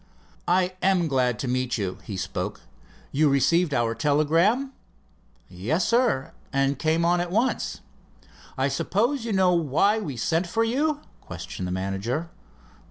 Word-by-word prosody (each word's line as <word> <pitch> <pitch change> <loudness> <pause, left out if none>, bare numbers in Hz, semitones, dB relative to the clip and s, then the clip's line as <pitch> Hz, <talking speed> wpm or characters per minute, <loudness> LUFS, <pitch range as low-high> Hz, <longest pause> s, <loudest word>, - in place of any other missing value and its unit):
"I 180 +1 +2
am 185 -3 +3
glad 125 -5 +1
to 135 - -4
meet 125 0 0
you," 95 -4 -3
he 100 - -6
spoke. - - -4 0.5
"You 150 +1 +3
received 165 +5 +3
our 120 -4 +1
telegram?" 165 - +2 0.8
"Yes, 110 - -1
sir, 230 - +1 0.2
and 135 0 +1
came 160 +1 +1
on 175 +1 +3
at 175 - -3
once." 230 +8 0 0.8
"I - - +2
suppose 235 +5 0
you 230 - -2
know 190 -2 +3
why 170 +7 +2
we 145 - -5
sent 165 +8 0
for 225 +6 +1
you?" 290 +6 0 0.2
questioned 90 0 -6
the - - -4
manager. 100 - -3
160 Hz, 145 wpm, -25 LUFS, 130-190 Hz, 0.8 s, am